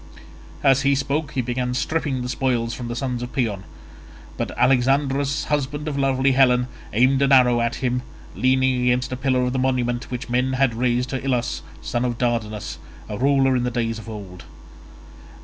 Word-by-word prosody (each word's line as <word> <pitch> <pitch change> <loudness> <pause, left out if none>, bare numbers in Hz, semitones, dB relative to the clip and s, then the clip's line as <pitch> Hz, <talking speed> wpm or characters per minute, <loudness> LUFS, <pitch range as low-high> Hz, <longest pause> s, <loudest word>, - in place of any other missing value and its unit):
As 135 -1 +5
he 140 0 +3
spoke 140 +2 -2
he 130 - 0
began 125 +1 -2
stripping 140 -3 -1
the - - -3
spoils 120 -3 0
from 120 - -6
the 120 - -4
son 125 -1 -2
of 125 0 -5
Paeon, 105 -7 -1 0.7
but - - -3
Alexandrus 135 +2 +2
husband 145 +1 -2
of 150 - -2
lovely 135 -1 +2
Helen 125 -1 +3 0.2
aimed 130 +5 +3
an 140 0 +3
arrow 125 -3 +5
at 115 0 0
him, 125 0 0 0.3
leaning 130 0 +2
against 125 +1 +1
a - - -1
pillar 130 -1 +1
of 125 0 -1
the 130 - 0
monument 125 -2 0
which 125 0 -5
men 125 +2 0
had 130 -2 +2
raised 125 +1 0
to 130 -1 -3
Ilus 125 -3 -1 0.2
son 120 - -1
of 120 -2 -1
Dardanus, 115 -4 -2 0.3
a 105 - -5
ruler 135 0 +3
in 125 - +1
days 115 -2 -1
of 110 - -10
old. 100 -5 -9
125 Hz, 180 wpm, -22 LUFS, 120-135 Hz, 0.7 s, As